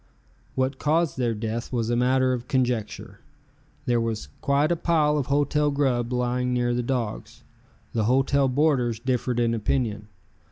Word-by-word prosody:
What 130 Hz, +1 st, -1 dB
caused 155 Hz, -2 st, +1 dB
their 120 Hz, -3 st, 0 dB
death 115 Hz, +2 st, -4 dB
was 120 Hz, -2 st, -1 dB
a -, -, +2 dB
matter 130 Hz, +1 st, +2 dB
of 125 Hz, -1 st, -4 dB
conjecture. 115 Hz, -6 st, -2 dB, 0.7 s
There 120 Hz, -3 st, +2 dB
was 115 Hz, -2 st, -3 dB
quite 140 Hz, +3 st, +2 dB
a -, -, +3 dB
pile 160 Hz, -3 st, +2 dB
of 135 Hz, -, -3 dB
hotel 145 Hz, +1 st, +2 dB
grub 130 Hz, -4 st, 0 dB
laying 125 Hz, 0 st, 0 dB
near 120 Hz, 0 st, +1 dB
the 120 Hz, -, 0 dB
dogs. 120 Hz, -3 st, -4 dB, 0.5 s
The 110 Hz, -2 st, 0 dB
hotel 135 Hz, +3 st, +2 dB
boarders 130 Hz, -4 st, +1 dB
differed 125 Hz, 0 st, -1 dB
in 115 Hz, -1 st, +2 dB
opinion. 110 Hz, -2 st, -1 dB
125 Hz, 155 wpm, -25 LUFS, 120-140 Hz, 0.7 s, a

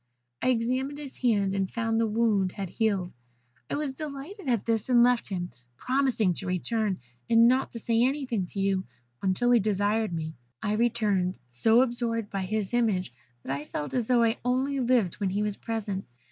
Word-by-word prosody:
"I -, -, 0 dB
examined 255 Hz, +4 st, 0 dB
his 285 Hz, -3 st, -9 dB
hand, 205 Hz, -6 st, +2 dB
and 195 Hz, -1 st, 0 dB
found 225 Hz, -1 st, 0 dB
the 225 Hz, -, +2 dB
wound 210 Hz, -4 st, +1 dB
had 195 Hz, -4 st, -5 dB
healed; 200 Hz, -6 st, 0 dB, 0.6 s
I -, -, -1 dB
was 290 Hz, -2 st, -2 dB
delighted 300 Hz, +5 st, -6 dB
at 235 Hz, -5 st, +1 dB
this, 225 Hz, +1 st, 0 dB
and 240 Hz, -1 st, +6 dB
left 245 Hz, -2 st, +2 dB
him, 180 Hz, -3 st, -3 dB, 0.3 s
promising 255 Hz, -, +1 dB
to 190 Hz, -, -5 dB
return, 200 Hz, +2 st, 0 dB, 0.3 s
and 230 Hz, 0 st, +6 dB
not 255 Hz, +2 st, +2 dB
to 230 Hz, -, -5 dB
say 230 Hz, +1 st, +1 dB
anything 250 Hz, -7 st, 0 dB
to 195 Hz, -, -6 dB
you 195 Hz, -1 st, +1 dB, 0.4 s
until 195 Hz, +6 st, +2 dB
he 240 Hz, -, +6 dB
desired 210 Hz, +1 st, +1 dB
me. 160 Hz, -1 st, -4 dB, 0.3 s
I 210 Hz, -, -1 dB
returned 215 Hz, -5 st, +1 dB
so 225 Hz, -, +4 dB
absorbed 235 Hz, -3 st, -2 dB
by 195 Hz, -1 st, -2 dB
his 215 Hz, +1 st, -2 dB
image 205 Hz, -, +1 dB, 0.3 s
that 135 Hz, -, -2 dB
I 145 Hz, +2 st, -6 dB
felt 150 Hz, -1 st, -5 dB
as 245 Hz, -4 st, 0 dB
though 245 Hz, -2 st, +4 dB
I 225 Hz, 0 st, +1 dB
only 260 Hz, +3 st, 0 dB
lived 240 Hz, -8 st, +2 dB
when 200 Hz, -2 st, 0 dB
he 205 Hz, +3 st, 0 dB
was 210 Hz, -1 st, -1 dB
present. 210 Hz, -4 st, -3 dB
225 Hz, 190 wpm, -28 LUFS, 195-245 Hz, 0.6 s, and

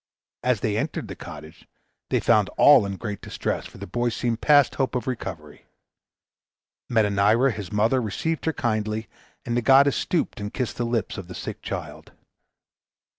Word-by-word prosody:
As 125 Hz, -5 st, +1 dB
they 105 Hz, -1 st, 0 dB
entered -, -, -3 dB
the -, -, -6 dB
cottage, 75 Hz, +2 st, -11 dB, 0.4 s
they -, -, +2 dB
found 105 Hz, -2 st, +3 dB
all 135 Hz, -8 st, +7 dB
in 100 Hz, -1 st, -5 dB
great 105 Hz, -2 st, -5 dB
distress, -, -, -3 dB
for -, -, -15 dB
the -, -, -7 dB
boy 120 Hz, +6 st, -1 dB
seemed 115 Hz, 0 st, -2 dB
past 145 Hz, -3 st, +5 dB
hope 135 Hz, -1 st, -1 dB
of 125 Hz, -, -2 dB
recovery. 85 Hz, -, -6 dB, 1.2 s
Metanira, 110 Hz, +3 st, +3 dB
his 105 Hz, -5 st, -7 dB
mother, 110 Hz, +5 st, +2 dB
received 150 Hz, +9 st, -2 dB
her 160 Hz, -, +1 dB
kindly, 110 Hz, -3 st, -2 dB, 0.4 s
and 120 Hz, -, -2 dB
the 120 Hz, -, +2 dB
goddess 135 Hz, +3 st, +5 dB
stooped 170 Hz, -10 st, -1 dB
and 105 Hz, 0 st, -6 dB
kissed 125 Hz, -4 st, -3 dB
the 120 Hz, -, -1 dB
lips 115 Hz, -3 st, -2 dB
of 90 Hz, -, -9 dB
the 90 Hz, -, -9 dB
sick -, -, -6 dB
child. -, -, -7 dB
115 Hz, 170 wpm, -24 LUFS, 105-125 Hz, 1.2 s, all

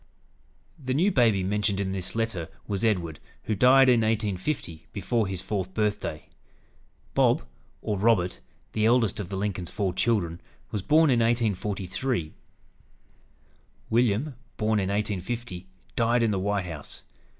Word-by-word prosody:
The 130 Hz, 0 st, -1 dB
new 185 Hz, +8 st, +3 dB
baby 115 Hz, -, +3 dB
mentioned 100 Hz, +1 st, 0 dB
in 95 Hz, -1 st, -1 dB
this 95 Hz, 0 st, -4 dB
letter 110 Hz, -8 st, -2 dB, 0.2 s
was 100 Hz, -1 st, -2 dB
Edward, 90 Hz, -9 st, 0 dB, 0.2 s
who 110 Hz, -, -1 dB
died 130 Hz, +5 st, +6 dB
in 120 Hz, -2 st, +5 dB
1850, 105 Hz, -, -2 dB
before 105 Hz, +2 st, 0 dB
his 95 Hz, -1 st, -4 dB
fourth 95 Hz, -3 st, -3 dB
birthday. 105 Hz, -7 st, -1 dB, 0.9 s
"Bob," -, -, +3 dB, 0.4 s
or 105 Hz, -3 st, -1 dB
Robert, 95 Hz, -4 st, +2 dB, 0.3 s
the 110 Hz, 0 st, +2 dB
eldest 115 Hz, -3 st, +3 dB
of 95 Hz, -4 st, -4 dB
the 95 Hz, -, -3 dB
Lincoln's 95 Hz, -3 st, -2 dB
four 100 Hz, -4 st, -1 dB
children, 95 Hz, -4 st, 0 dB, 0.3 s
was 105 Hz, -, -2 dB
born 155 Hz, -, +4 dB
in 120 Hz, -, +3 dB
1843. 105 Hz, -3 st, -1 dB, 1.6 s
William, 120 Hz, +4 st, +2 dB, 0.2 s
born 110 Hz, 0 st, +1 dB
in 95 Hz, -1 st, -1 dB
1850, 100 Hz, -1 st, -3 dB, 0.3 s
died 115 Hz, +1 st, +3 dB
in 115 Hz, -, +2 dB
the 100 Hz, -, 0 dB
White 100 Hz, 0 st, 0 dB
House. 80 Hz, -4 st, -7 dB
105 Hz, 140 wpm, -27 LUFS, 95-115 Hz, 1.6 s, died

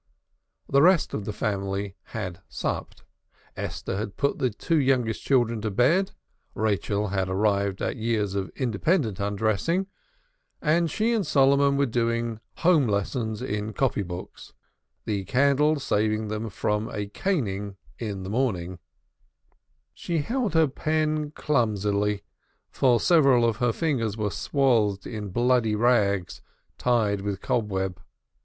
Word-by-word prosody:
The 140 Hz, -, +4 dB
rest 180 Hz, +1 st, +4 dB
of 100 Hz, -, -3 dB
the 105 Hz, -, -3 dB
family 100 Hz, -2 st, -2 dB
had 95 Hz, -4 st, -6 dB
supped. -, -, -4 dB, 0.5 s
Esther 95 Hz, -, -4 dB
had 105 Hz, -1 st, -5 dB
put 140 Hz, -, 0 dB
the 130 Hz, -, +2 dB
two 155 Hz, +9 st, 0 dB
youngest 130 Hz, -5 st, +1 dB
children 120 Hz, -4 st, +1 dB
to 110 Hz, -, -1 dB
bed 145 Hz, -, +2 dB, 0.4 s
(Rachel 105 Hz, -1 st, 0 dB
had 95 Hz, -1 st, -1 dB
arrived 100 Hz, 0 st, 0 dB
at -, -, -2 dB
years 110 Hz, -3 st, -1 dB
of 95 Hz, -2 st, -2 dB
independent 120 Hz, -, 0 dB
undressing), 110 Hz, -, 0 dB, 0.7 s
and 165 Hz, +2 st, +2 dB
she 220 Hz, +9 st, +1 dB
and 220 Hz, -3 st, +1 dB
Solomon 140 Hz, -2 st, +3 dB
were 140 Hz, -, +3 dB
doing 115 Hz, -2 st, -1 dB, 0.2 s
home 165 Hz, -7 st, +3 dB
lessons 110 Hz, +2 st, -2 dB
in 105 Hz, -3 st, -3 dB
copy 130 Hz, -5 st, 0 dB
books, 90 Hz, -1 st, -8 dB, 0.5 s
the 100 Hz, -3 st, -1 dB
candle 140 Hz, +4 st, +3 dB
saving 110 Hz, -3 st, 0 dB
them 110 Hz, +1 st, -3 dB
from 105 Hz, +2 st, -1 dB
a 105 Hz, -1 st, -3 dB
caning 100 Hz, -, -2 dB, 0.2 s
on 100 Hz, -4 st, -4 dB
the 95 Hz, -, -6 dB
morrow. 95 Hz, -8 st, -1 dB, 1.1 s
She 170 Hz, -, -3 dB
held 230 Hz, -, -1 dB
her 160 Hz, -1 st, +5 dB
pen 155 Hz, +1 st, -1 dB
clumsily, 105 Hz, -8 st, 0 dB, 0.5 s
for 125 Hz, -3 st, +3 dB
several 135 Hz, -6 st, +5 dB
of 115 Hz, -2 st, +1 dB
her 120 Hz, 0 st, +2 dB
fingers 115 Hz, -7 st, -1 dB
were 105 Hz, -2 st, -1 dB
swathed 115 Hz, -9 st, +1 dB
in 105 Hz, -3 st, -5 dB
bloody 120 Hz, +1 st, +2 dB
rags 105 Hz, -6 st, +1 dB, 0.4 s
tied 110 Hz, -5 st, +1 dB
with 100 Hz, -2 st, -3 dB
cobweb. 95 Hz, -5 st, -2 dB
110 Hz, 135 wpm, -26 LUFS, 100-140 Hz, 1.1 s, her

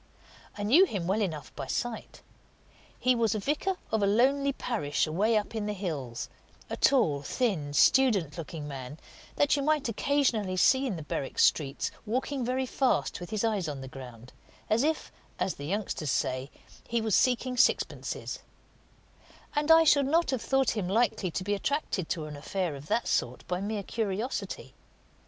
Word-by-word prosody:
I 205 Hz, -, -3 dB
knew 290 Hz, -, +6 dB
him 195 Hz, -, -3 dB
well 195 Hz, +5 st, +1 dB
enough 155 Hz, -8 st, -4 dB
by -, -, -5 dB
sight. 240 Hz, -2 st, -4 dB, 0.8 s
He 255 Hz, -, +3 dB
was 230 Hz, -3 st, +1 dB
a -, -, -1 dB
vicar 300 Hz, -, -1 dB, 0.2 s
of 220 Hz, -1 st, +1 dB
a 200 Hz, -, +3 dB
lonely 275 Hz, +7 st, +3 dB
parish 215 Hz, -, -1 dB
away 205 Hz, +8 st, +2 dB
up 210 Hz, -, -2 dB
in 215 Hz, -2 st, -2 dB
the 210 Hz, -, -1 dB
hills 150 Hz, -, -4 dB, 0.4 s
a -, -, -1 dB
tall, 160 Hz, -, +3 dB
thin, 170 Hz, -, -1 dB
student 200 Hz, -, +4 dB
looking 160 Hz, -2 st, -6 dB
man 135 Hz, 0 st, -7 dB, 0.4 s
that 290 Hz, 0 st, +3 dB
you 285 Hz, -, -1 dB
might 300 Hz, -1 st, +1 dB
occasionally 230 Hz, -6 st, +1 dB
see 265 Hz, +8 st, +4 dB
in 215 Hz, -, -2 dB
the 160 Hz, -, -6 dB
Berwick 140 Hz, -2 st, -4 dB
streets, 140 Hz, -3 st, +2 dB, 0.2 s
walking 260 Hz, +4 st, -1 dB
very 255 Hz, +2 st, 0 dB
fast 260 Hz, +1 st, 0 dB
with 175 Hz, -, -8 dB
his 215 Hz, -1 st, -2 dB
eyes 210 Hz, -6 st, 0 dB
on 145 Hz, -3 st, -5 dB
the 130 Hz, -, -7 dB
ground, 125 Hz, -2 st, -11 dB, 0.4 s
as 220 Hz, +2 st, +4 dB
if, 315 Hz, +1 st, -1 dB, 0.3 s
as 190 Hz, -, -1 dB
the 145 Hz, -, -8 dB
youngsters 190 Hz, -5 st, -2 dB
say, 130 Hz, +2 st, -1 dB, 0.4 s
he 235 Hz, -, 0 dB
was 220 Hz, -2 st, -1 dB
seeking 255 Hz, 0 st, +2 dB
sixpences; 250 Hz, -, 0 dB, 1.2 s
and 295 Hz, +1 st, 0 dB
I 325 Hz, 0 st, +8 dB
should 285 Hz, -3 st, +4 dB
not 330 Hz, +1 st, +2 dB
have 260 Hz, -4 st, -1 dB
thought 270 Hz, -2 st, +2 dB
him 210 Hz, -5 st, -2 dB
likely 200 Hz, -2 st, +1 dB
to 185 Hz, -, -3 dB
be 205 Hz, +2 st, -1 dB
attracted 205 Hz, -, -1 dB
to 160 Hz, -4 st, -2 dB
an 150 Hz, -1 st, -7 dB
affair 170 Hz, +2 st, -3 dB
of 140 Hz, +2 st, -10 dB
that 235 Hz, -, 0 dB
sort 125 Hz, +1 st, -1 dB
by 180 Hz, +1 st, -2 dB
mere 205 Hz, 0 st, -3 dB
curiosity. 220 Hz, +4 st, -3 dB
210 Hz, 175 wpm, -29 LUFS, 160-255 Hz, 1.2 s, I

